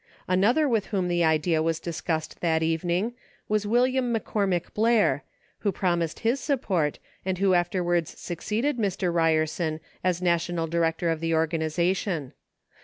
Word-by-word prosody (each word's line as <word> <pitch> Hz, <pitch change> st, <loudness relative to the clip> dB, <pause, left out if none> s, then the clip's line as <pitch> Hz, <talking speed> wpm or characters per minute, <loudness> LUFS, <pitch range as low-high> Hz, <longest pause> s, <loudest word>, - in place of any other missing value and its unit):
Another 215 Hz, +12 st, +3 dB
with 225 Hz, -6 st, +1 dB
whom 190 Hz, -4 st, -1 dB
the 175 Hz, -1 st, +1 dB
idea 160 Hz, 0 st, +2 dB
was 165 Hz, 0 st, 0 dB
discussed 160 Hz, -1 st, -3 dB
that 160 Hz, -2 st, +1 dB
evening 175 Hz, +7 st, 0 dB, 0.3 s
was 210 Hz, -1 st, 0 dB
William 250 Hz, +2 st, +2 dB
McCormick 200 Hz, -5 st, -1 dB
Blair, 225 Hz, 0 st, +3 dB, 0.4 s
who 205 Hz, -, 0 dB
promised 175 Hz, -3 st, -1 dB
his 240 Hz, +4 st, +1 dB
support, 190 Hz, -, 0 dB, 0.3 s
and 190 Hz, 0 st, -1 dB
who 190 Hz, 0 st, +3 dB
afterwards 175 Hz, -1 st, 0 dB
succeeded 220 Hz, -, -2 dB
Mr. 190 Hz, -4 st, 0 dB
Ryer 165 Hz, -2 st, +3 dB
son 155 Hz, 0 st, -3 dB, 0.2 s
as 180 Hz, -2 st, +1 dB
national 170 Hz, -1 st, 0 dB
director 165 Hz, 0 st, 0 dB
of 165 Hz, -, -2 dB
the 165 Hz, 0 st, 0 dB
organization. 165 Hz, 0 st, 0 dB
175 Hz, 140 wpm, -26 LUFS, 165-205 Hz, 0.4 s, Another